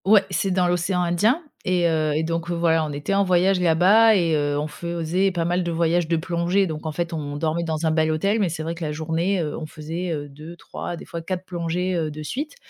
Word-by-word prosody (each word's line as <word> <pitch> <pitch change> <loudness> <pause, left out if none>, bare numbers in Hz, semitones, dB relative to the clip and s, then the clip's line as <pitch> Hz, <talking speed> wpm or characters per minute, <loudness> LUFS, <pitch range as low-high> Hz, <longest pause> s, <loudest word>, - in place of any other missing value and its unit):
Ouais, 205 0 +6
c'est 185 +2 0
dans 180 -1 +2
l'océan 180 +1 0
Indien 210 - +2 0.2
et 180 -3 +2
heu, 155 -2 +1
et 155 - +1
donc, 165 +1 -2
voilà, 170 -2 +2
on 155 - -3
était 145 +6 -3
en 200 0 +3
voyage 185 0 +3
là-bas 185 +7 +5
et 170 -4 +2
heu, 145 -1 0
on 150 - -1
faisait 170 +4 -1
pas 170 -2 -1
mal 175 +2 +1
de 170 - -2
voyages 170 0 +1
de 165 0 +1
plongée. 175 +3 +1
Donc, 155 -2 -5
en - - -1
fait, 170 +2 -3
on 145 -2 -4
dormait 160 +2 -1
dans 160 -1 -2
un 160 - +3
bel 160 0 +2
hôtel, 195 +8 +1
mais 195 -4 +2
c'est 160 -1 -4
vrai 165 +1 -3
que 170 0 -7
la 150 - -2
journée, 165 +5 -1
heu, 150 -2 -3
on 155 - -6
faisait, 165 +4 -5
heu, 145 -2 -3
2-3, 155 +4 -8
des - - -10
fois 170 - -6
4 185 +2 -4
plongées, 180 +1 -2
heu, 165 -3 -1
de 150 +1 -7
suite 290 - -4
170 Hz, 245 wpm, -23 LUFS, 160-180 Hz, 0.2 s, Ouais